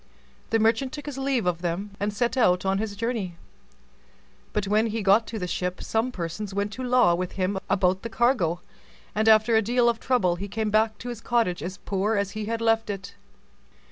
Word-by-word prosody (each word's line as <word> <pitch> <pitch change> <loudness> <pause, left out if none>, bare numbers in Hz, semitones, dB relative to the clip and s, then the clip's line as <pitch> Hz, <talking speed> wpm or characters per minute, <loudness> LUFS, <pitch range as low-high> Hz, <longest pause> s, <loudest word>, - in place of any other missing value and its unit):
The 225 - +3
merchant 225 +4 +1
took 295 -1 -7
his 285 -2 -5
leave 270 -5 0
of 175 -1 0
them, 180 +4 -3
and 205 +1 0
set 235 +5 -1
out 180 -7 +3
on 195 0 +1
his 210 -1 -3
journey; 210 -6 -3 1.1
but 205 -2 -1
when 215 +3 +3
he 220 -1 -3
got 200 +4 +4
to 225 - -5
the 185 - -3
ship, 180 0 -3
some 225 +3 0
persons 190 +2 -5
went 200 +1 -1
to 260 - -6
law 250 -8 +4
with 180 +1 -2
him 190 +1 -1
about 185 0 +2
the 230 - -5
cargo, 210 -9 +1 0.5
and 215 +1 +2
after 220 +1 +5
a 220 - +5
deal 240 +3 +2
of 235 -1 +1
trouble 185 -9 +1
he 200 +3 -5
came 215 +1 -2
back 215 0 +2
to 245 - -7
his 235 -2 -6
cottage 225 -10 0
as 180 +4 -5
poor 200 +3 -1
as 200 -1 0
he 215 0 -4
had 230 +1 -2
left 225 -1 +2
it. 195 -1 -5
215 Hz, 210 wpm, -25 LUFS, 190-230 Hz, 1.1 s, after